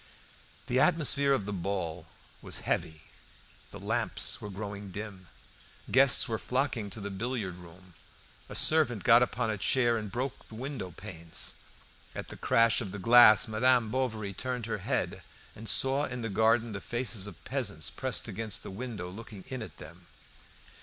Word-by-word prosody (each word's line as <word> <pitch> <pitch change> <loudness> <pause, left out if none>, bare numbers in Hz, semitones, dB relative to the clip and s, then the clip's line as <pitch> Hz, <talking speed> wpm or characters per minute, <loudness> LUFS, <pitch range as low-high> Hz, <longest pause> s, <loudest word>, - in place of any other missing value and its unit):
The 125 - +1
atmosphere 140 -4 +4
of 130 -8 +1
the 105 - -4
ball 90 -3 -3 0.3
was - - -4
heavy; 80 -1 -2 0.7
the - - -10
lamps - - -1
were 105 - -6
growing 100 0 -6
dim. 95 -1 -8 0.6
Guests 135 0 +6
were 110 -1 -2
flocking 125 -5 -1
to 105 - -6
the 100 0 -5
billiard 100 -3 -3
room. 90 +1 -14 0.6
A - - -7
servant 145 - +3
got 115 +1 +7
upon 115 -2 0
a 105 - -4
chair 120 +2 +2
and 105 -2 -7
broke 125 +5 -4
the 110 - -11
window 125 -5 -5
panes. 85 -3 -4 0.6
At - - -6
the - - -8
crash 115 +1 +3
of 100 -5 -5
the 105 - -6
glass 115 +2 +7
Madame 115 +1 +2
Bovary 110 -6 -2
turned 125 +2 -3
her 115 -2 -3
head - - -2 0.3
and 110 0 -2
saw 135 +5 +3
in 125 -3 -5
the 115 - -2
garden 110 +3 +2
the 100 -1 -5
faces 120 -4 -2
of 80 -6 -12
peasants 100 - -1
pressed 130 -4 -2
against 110 0 -3
the - - -7
window 105 -3 -5
looking 100 +1 -10
in 130 -2 -4
at 110 - -9
them. 85 +2 -13
110 Hz, 165 wpm, -30 LUFS, 95-125 Hz, 0.7 s, got